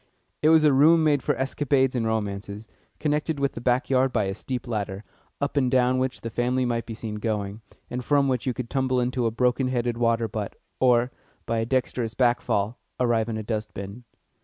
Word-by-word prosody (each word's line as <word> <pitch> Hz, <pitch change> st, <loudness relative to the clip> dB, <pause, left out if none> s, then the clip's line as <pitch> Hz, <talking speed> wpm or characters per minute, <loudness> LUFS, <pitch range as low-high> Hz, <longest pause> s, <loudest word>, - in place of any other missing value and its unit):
It 155 Hz, -, +4 dB
was 160 Hz, -1 st, +6 dB
a 150 Hz, -2 st, +5 dB
room 160 Hz, +4 st, +6 dB
made 145 Hz, -3 st, +3 dB
for -, -, 0 dB
escapades 135 Hz, 0 st, +1 dB
and 115 Hz, -3 st, 0 dB
romances, 105 Hz, -1 st, -3 dB, 0.3 s
connected 150 Hz, 0 st, 0 dB
with 140 Hz, 0 st, +1 dB
the 115 Hz, -, -8 dB
back 125 Hz, +2 st, +1 dB
yard 130 Hz, 0 st, +2 dB
by 110 Hz, -4 st, +1 dB
a 95 Hz, 0 st, -2 dB
steep 125 Hz, +4 st, -5 dB
ladder, 105 Hz, -3 st, -3 dB, 0.4 s
up 140 Hz, +1 st, -2 dB
and 130 Hz, -3 st, +2 dB
down 130 Hz, 0 st, +3 dB
which 130 Hz, 0 st, -2 dB
the 115 Hz, -, -5 dB
family 125 Hz, +3 st, 0 dB
might 120 Hz, -1 st, -1 dB
be 115 Hz, -, -5 dB
seen 110 Hz, -1 st, -5 dB
going, 105 Hz, -1 st, -3 dB, 0.3 s
and 125 Hz, +1 st, -4 dB
from 140 Hz, 0 st, +3 dB
which 130 Hz, -1 st, -1 dB
you 125 Hz, -, +1 dB
could 125 Hz, -, -4 dB
tumble 130 Hz, -2 st, +1 dB
into 125 Hz, -1 st, 0 dB
a -, -, +2 dB
broken 125 Hz, +3 st, +1 dB
headed 120 Hz, -2 st, -1 dB
water 115 Hz, -1 st, +2 dB
butt, 105 Hz, -1 st, -5 dB, 0.2 s
or, 125 Hz, -1 st, +3 dB, 0.3 s
by 115 Hz, -1 st, 0 dB
a 115 Hz, -, -1 dB
dexterous 125 Hz, -3 st, -1 dB
back 120 Hz, -2 st, +3 dB
fall, 105 Hz, +4 st, -1 dB, 0.2 s
arrive 120 Hz, -2 st, +2 dB
in 110 Hz, -, -2 dB
a 110 Hz, -, -4 dB
dustbin. 105 Hz, 0 st, -5 dB
125 Hz, 210 wpm, -25 LUFS, 110-130 Hz, 0.4 s, was